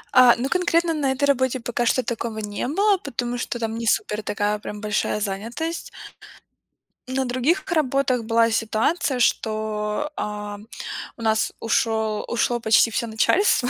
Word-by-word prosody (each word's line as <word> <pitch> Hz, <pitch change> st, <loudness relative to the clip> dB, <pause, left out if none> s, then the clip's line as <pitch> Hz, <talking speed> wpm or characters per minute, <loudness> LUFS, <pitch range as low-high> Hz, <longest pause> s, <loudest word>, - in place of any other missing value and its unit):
Э, 250 Hz, -2 st, +8 dB
ну, 245 Hz, +3 st, -1 dB
конкретно 340 Hz, -1 st, +2 dB
на 285 Hz, -4 st, 0 dB
этой 265 Hz, +1 st, -3 dB
работе 260 Hz, -2 st, +1 dB
пока 240 Hz, 0 st, -2 dB
что 255 Hz, -, +2 dB
такого 230 Hz, -2 st, -3 dB
не 210 Hz, +1 st, -3 dB
было, 400 Hz, +8 st, +3 dB
потому 245 Hz, -, -3 dB
что 240 Hz, -, -3 dB
там 225 Hz, -1 st, -2 dB
не 230 Hz, 0 st, -3 dB
супер 210 Hz, 0 st, +1 dB
такая 210 Hz, 0 st, -1 dB
прям 210 Hz, 0 st, -7 dB
большая 210 Hz, 0 st, -1 dB
занятость. 230 Hz, +12 st, -4 dB, 1.2 s
На 260 Hz, +1 st, -1 dB
других 255 Hz, +8 st, +1 dB
работах 275 Hz, -5 st, +1 dB
была 230 Hz, +1 st, +3 dB
ситуация, 230 Hz, +6 st, 0 dB
что, 215 Hz, +3 st, 0 dB
а, 210 Hz, 0 st, -4 dB, 0.6 s
у -, -, -11 dB
нас 220 Hz, -1 st, +1 dB
ушёл 220 Hz, -1 st, 0 dB
ушло 240 Hz, 0 st, 0 dB
почти 225 Hz, +1 st, +4 dB
всё 235 Hz, -, -1 dB
начальство. 245 Hz, -, +2 dB
235 Hz, 150 wpm, -23 LUFS, 220-265 Hz, 1.2 s, Э